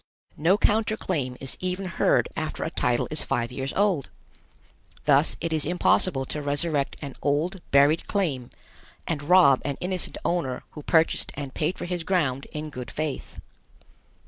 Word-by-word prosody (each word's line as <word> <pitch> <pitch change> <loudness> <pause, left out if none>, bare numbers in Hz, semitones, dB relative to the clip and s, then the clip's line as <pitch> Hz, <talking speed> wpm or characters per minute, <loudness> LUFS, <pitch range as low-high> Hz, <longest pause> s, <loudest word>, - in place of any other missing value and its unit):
No 175 +6 +3
counter 215 +1 +2
claim 130 -12 -2
is 135 - -2
even 185 +1 -2
heard 180 - +2
after - - -3
a - - -3
title 120 - +1
is 155 - +1
five 120 -2 -1
years 135 +2 -3
old. 195 -9 +1 1.0
Thus 145 +1 +4
it 165 -1 -2
is 155 -2 +3
impossible 175 -3 +2
to 150 - -4
resurrect 145 0 -1
an 140 -2 -6
old 160 +6 0
buried 145 +4 +4
claim 145 -12 -1 0.6
and 155 -3 -2
rob 145 -4 +5
an 140 -2 -2
innocent 180 0 -1
owner 145 -8 -1
who 150 - -9
purchased 160 +2 +2
and 140 -2 -6
paid 160 +4 -1
for - - -5
his 175 -1 -3
ground 150 -7 0
in 150 0 -5
good 125 -4 -7
faith. 155 -2 -4
150 Hz, 160 wpm, -25 LUFS, 140-180 Hz, 1.0 s, rob